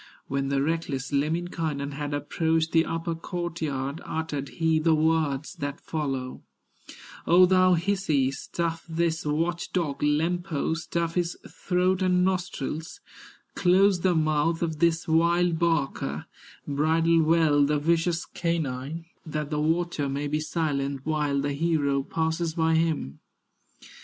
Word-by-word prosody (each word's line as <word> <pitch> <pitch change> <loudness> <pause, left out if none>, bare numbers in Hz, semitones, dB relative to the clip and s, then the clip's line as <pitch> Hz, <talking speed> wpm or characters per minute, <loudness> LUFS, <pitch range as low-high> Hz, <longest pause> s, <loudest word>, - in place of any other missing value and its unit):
When 135 0 -2
the 140 0 +1
reckless 145 -4 -2
Lemminkainen 155 -1 -1
Had 145 +1 -4
approached 160 +3 0
the 165 0 +4
upper 165 +1 -2
court 175 0 -5
yard, 140 0 -3
Uttered 150 -4 -4
he 160 -1 +2
the 160 0 +3
words 155 -2 +1
that 145 0 -4
follow: 135 -5 -4 0.9
"O 180 +2 +7
thou 185 0 +4
Hisi, 165 -7 +1
stuff 165 +4 -3
this 165 -1 -1
watch 165 +3 -1
dog, 160 -6 -1
Lempo, 160 +2 0
stuff 165 +1 -2
his 175 -1 -1
throat 180 +1 0
and 180 -1 +3
nostrils, 175 -4 -3 0.5
Close 190 +1 +4
the 180 0 +2
mouth 155 +1 +1
of 160 -2 -2
this 165 0 +2
wild 170 +1 +2
barker, 165 -5 -1 0.4
Bridle 160 +3 +3
well 155 -2 +4
the 150 +1 +2
vicious 165 +3 +1
canine, 160 -2 -3 0.2
That 155 -2 -4
the 150 0 0
watcher 160 -2 0
may 140 +2 -2
be 150 +1 -1
silent 140 -4 -2
While 150 -2 0
the 145 0 -1
hero 145 -3 +1
passes 160 +3 -2
by 160 -1 +2
him." 160 - 0
160 Hz, 130 wpm, -26 LUFS, 145-170 Hz, 0.9 s, O